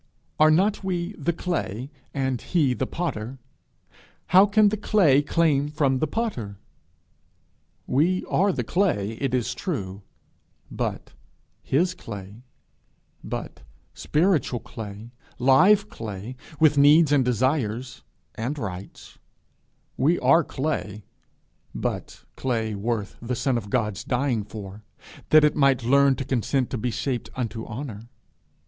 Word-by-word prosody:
Are 155 Hz, 0 st, +7 dB
not 195 Hz, +7 st, +2 dB
we 180 Hz, 0 st, -2 dB
the 170 Hz, -2 st, -1 dB
clay, 150 Hz, -, -3 dB, 0.2 s
and 130 Hz, -3 st, -2 dB
he 150 Hz, -8 st, +1 dB
the 130 Hz, +1 st, -2 dB
potter? 135 Hz, -7 st, -4 dB, 0.9 s
how 190 Hz, +3 st, +7 dB
can 210 Hz, 0 st, +4 dB
the 215 Hz, -, -1 dB
clay 185 Hz, -9 st, +3 dB
claim 145 Hz, -2 st, +1 dB
from 140 Hz, -3 st, +1 dB
the 155 Hz, -, 0 dB
potter? 135 Hz, -, -3 dB, 1.3 s
We 170 Hz, +8 st, +1 dB
are 195 Hz, +3 st, +2 dB
the -, -, -2 dB
clay, 160 Hz, -, 0 dB
it 135 Hz, -2 st, 0 dB
is 120 Hz, -3 st, -1 dB
true, 100 Hz, -, -4 dB, 0.7 s
but -, -, -4 dB, 0.5 s
his 175 Hz, +7 st, +1 dB
clay, 105 Hz, -, -9 dB, 0.8 s
but -, -, -6 dB, 0.3 s
spiritual 155 Hz, -6 st, +1 dB
clay, 110 Hz, +1 st, -9 dB, 0.3 s
live 185 Hz, +12 st, +5 dB
clay, 110 Hz, -, -7 dB, 0.2 s
with 150 Hz, -2 st, +5 dB
needs 150 Hz, +2 st, +6 dB
and 140 Hz, -3 st, +4 dB
desires 125 Hz, -1 st, -1 dB, 0.3 s
and 125 Hz, +7 st, -4 dB
rights; 95 Hz, -7 st, -8 dB, 0.8 s
we 160 Hz, +7 st, +3 dB
are 135 Hz, +7 st, +4 dB
clay, 130 Hz, -9 st, -3 dB, 0.7 s
but -, -, -4 dB
clay 115 Hz, -4 st, -1 dB
worth 105 Hz, 0 st, -3 dB
the 120 Hz, +2 st, -3 dB
Son 130 Hz, +1 st, 0 dB
of 105 Hz, -4 st, -3 dB
God's 105 Hz, -1 st, -1 dB
dying 125 Hz, -4 st, 0 dB
for, 105 Hz, 0 st, -9 dB, 0.5 s
that 155 Hz, 0 st, +7 dB
it 150 Hz, 0 st, +3 dB
might 140 Hz, -4 st, +3 dB
learn 140 Hz, +2 st, +4 dB
to 135 Hz, -, -5 dB
consent 130 Hz, 0 st, 0 dB
to 130 Hz, -, -2 dB
be 125 Hz, -, -1 dB
shaped 125 Hz, +2 st, -3 dB
unto 115 Hz, -2 st, -4 dB
honour. 115 Hz, -2 st, -7 dB
130 Hz, 130 wpm, -25 LUFS, 115-155 Hz, 1.3 s, Are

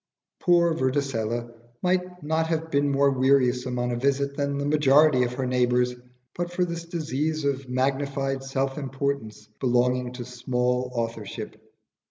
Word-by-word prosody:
Poor 170 Hz, -2 st, +4 dB
Vorticella 120 Hz, -5 st, -1 dB, 0.3 s
might 180 Hz, -1 st, 0 dB
not 160 Hz, +2 st, 0 dB
have 160 Hz, 0 st, -2 dB
been 140 Hz, 0 st, +2 dB
more 140 Hz, 0 st, +3 dB
wearisome 130 Hz, -1 st, +2 dB
on 120 Hz, 0 st, 0 dB
a -, -, -1 dB
visit 140 Hz, +2 st, 0 dB
than 140 Hz, -1 st, -1 dB
the 140 Hz, -, -2 dB
majority 150 Hz, -1 st, +5 dB
of 125 Hz, 0 st, 0 dB
her 130 Hz, +1 st, -2 dB
neighbours, 125 Hz, 0 st, +2 dB, 0.4 s
but 175 Hz, 0 st, -3 dB
for 180 Hz, 0 st, +1 dB
this 170 Hz, -1 st, -5 dB
disease 155 Hz, -2 st, -2 dB
of 135 Hz, -2 st, -1 dB
magnified 135 Hz, +1 st, -1 dB
self 135 Hz, +1 st, -2 dB
importance 135 Hz, -6 st, -3 dB
belonging 125 Hz, 0 st, +1 dB
to 125 Hz, -1 st, -6 dB
small 125 Hz, 0 st, -1 dB
authorship. 115 Hz, -3 st, -4 dB
135 Hz, 145 wpm, -26 LUFS, 125-150 Hz, 0.4 s, majority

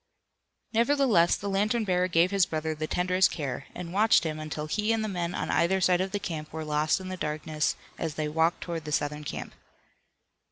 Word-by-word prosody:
Nevertheless, 235 Hz, -7 st, +4 dB
the 200 Hz, -, -6 dB
lantern 210 Hz, +4 st, +1 dB
bearer 180 Hz, -2 st, +1 dB
gave 175 Hz, +1 st, +3 dB
his 195 Hz, -3 st, +3 dB
brother 160 Hz, 0 st, -2 dB
the 155 Hz, 0 st, -4 dB
tenderest 185 Hz, +2 st, +2 dB
care, 140 Hz, -3 st, -4 dB
and 175 Hz, -1 st, -6 dB
watched 215 Hz, 0 st, +4 dB
him 155 Hz, -2 st, -3 dB
until 155 Hz, 0 st, -4 dB
he 210 Hz, +8 st, 0 dB
and 225 Hz, -1 st, +1 dB
the -, -, -1 dB
men 175 Hz, -3 st, -3 dB
on -, -, -2 dB
either 190 Hz, +3 st, +2 dB
side 180 Hz, -1 st, +3 dB
of 190 Hz, 0 st, -2 dB
him 165 Hz, -6 st, -4 dB
were 160 Hz, 0 st, -5 dB
lost 150 Hz, +3 st, +1 dB
in 185 Hz, 0 st, -7 dB
the 185 Hz, -, -4 dB
darkness 155 Hz, -1 st, -1 dB, 0.2 s
as 160 Hz, -2 st, -3 dB
they 155 Hz, -1 st, -1 dB
walked 160 Hz, +3 st, +1 dB
toward 165 Hz, -3 st, -4 dB
the 150 Hz, -, -5 dB
Southern 150 Hz, +1 st, -1 dB
camp. -, -, -6 dB
170 Hz, 200 wpm, -28 LUFS, 155-190 Hz, 0.2 s, Nevertheless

